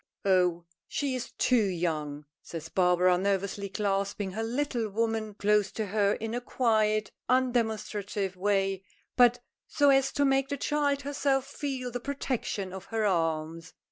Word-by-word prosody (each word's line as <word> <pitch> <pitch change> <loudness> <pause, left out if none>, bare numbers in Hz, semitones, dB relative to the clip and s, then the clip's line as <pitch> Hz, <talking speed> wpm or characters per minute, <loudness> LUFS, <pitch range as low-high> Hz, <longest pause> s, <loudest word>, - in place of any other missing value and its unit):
"Oh! 180 -3 +2 0.2
she 280 -2 -2
is 255 -2 -4
too 250 -3 +3
young," 155 -6 -2 0.2
says 160 -1 -7
Barbara, 180 0 +3
nervously 200 +1 -1
clasping 200 -1 -1
her 215 +4 -4
little 235 -1 -1
woman 220 0 -1
close 210 -1 +2
to 220 - -2
her 200 0 +2
in 225 +1 -4
a 245 - -2
quiet, 215 -4 +1 0.2
undemonstrative 220 -6 0
way, 195 0 0 0.3
but 245 -1 +5 0.2
so 285 -2 +4
as 270 -1 +3
to 285 - +2
make 270 0 +2
the 285 - -2
child 285 0 0
herself 275 -1 0
feel 275 -3 -4
the 245 - -3
protection 240 -7 -3
of 190 - -7
her 220 -1 -1
arms. 165 -3 -1
215 Hz, 145 wpm, -29 LUFS, 190-250 Hz, 0.3 s, but